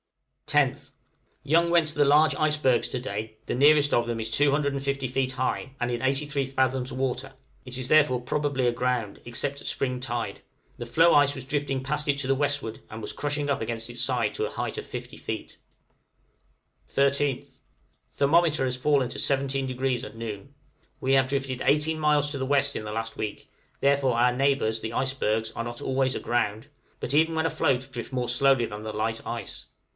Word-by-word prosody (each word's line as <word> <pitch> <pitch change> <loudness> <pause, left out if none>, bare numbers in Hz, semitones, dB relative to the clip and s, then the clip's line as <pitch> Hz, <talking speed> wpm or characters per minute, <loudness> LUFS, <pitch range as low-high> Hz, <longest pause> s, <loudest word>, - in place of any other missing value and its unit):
10th. - - +1 0.5
Young 170 +3 +3
went 170 -2 +4
to 155 - -6
the 145 - +4
large 150 +2 +5
icebergs 150 -5 +2
to 130 - -2
day; 110 -2 -5
the - - -2
nearest 145 +2 +5
of 120 - +3
them 115 -1 -3
is 110 - -2
250 140 -1 +1
feet 130 +1 -1
high, 130 +1 -2
and 120 - -1
in 120 - -2
83 140 +1 0
fathoms 130 -1 0
water; 135 +1 -3 0.3
it 125 0 -6
is 130 -1 -3
therefore 145 -4 +4
probably 135 0 0
aground, 120 -3 -1
except 140 +4 -3
at - - -7
spring 125 -2 -1
tide; 120 -2 -3 0.4
the 120 - -5
floe 165 +7 +5
ice 145 -1 +4
was 135 -2 -6
drifting 140 -1 -1
past 150 +2 -1
it 140 - +3
to 140 -2 -1
the 135 - +3
westward, 140 -5 -2
and 110 +1 -7
was - - -4
crushing 145 0 -2
up 140 - 0
against 115 +1 -4
its 120 0 -3
side 135 - 0
to - - -3
a - - -3
height - - -4
of - - -5
50 - - -7
feet. - - -6 1.4
{CANINE 140 0 +4
APPETITE.} 140 -2 -1
13th. - - -27 0.5
Thermometer 155 0 +3
has 125 -1 0
fallen 135 0 +2
to - - -6
17° 135 -2 0
at 115 - -9
noon. 115 +3 -7 0.5
We 135 - +1
have 135 -1 +4
drifted 135 -2 -2
18 150 +2 +2
miles 150 -1 +2
to 145 - -3
the 130 - -1
W. 140 0 +4
in - - -3
the 105 - -5
last 115 +1 -4
week; 105 -1 -5 0.3
therefore 135 -3 +2
our 125 +1 +3
neighbors, 135 -5 +1
the 110 +1 -4
icebergs, 115 -4 0
are 115 - -4
not 120 0 -6
always 130 0 0
aground, 110 -2 -1 0.3
but 130 - -3
even 160 +2 +3
when 160 0 +1
afloat 135 -5 +1
drift 120 -2 -6
more 125 -2 -1
slowly 130 0 +3
than 105 -1 -7
the 110 - -4
light 110 +1 -2
ice. - - -6
135 Hz, 190 wpm, -26 LUFS, 120-145 Hz, 1.4 s, large